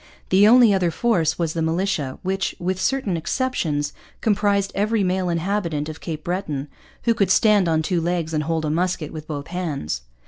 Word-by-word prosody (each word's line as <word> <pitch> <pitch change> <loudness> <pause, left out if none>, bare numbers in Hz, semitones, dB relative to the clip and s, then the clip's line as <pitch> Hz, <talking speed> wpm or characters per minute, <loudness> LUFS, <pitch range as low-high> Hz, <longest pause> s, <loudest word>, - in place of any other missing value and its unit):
The 195 +2 +6
only 235 -2 +7
other 185 -3 +2
force 165 -5 +1
was 165 -2 -1
the 165 - -2
militia, 160 -4 -1
which, 190 +1 -1
with 185 +1 -2
certain 265 -9 0
exceptions, 160 - -1 0.3
comprised 200 -2 +1
every 210 +1 +1
male 185 0 0
inhabitant 170 -3 -1
of 155 - -8
Cape 155 -2 -5
Breton 155 -6 -3 0.3
who 230 - +3
could 200 -3 +1
stand 210 -4 +4
on 160 -1 +1
two 175 +1 0
legs 170 -1 -1
and 150 -1 0
hold 160 0 -1
a 150 - 0
musket 170 -1 -1
with 155 -1 -8
both 145 -2 -5
hands. 150 - -3
175 Hz, 180 wpm, -22 LUFS, 155-200 Hz, 0.3 s, only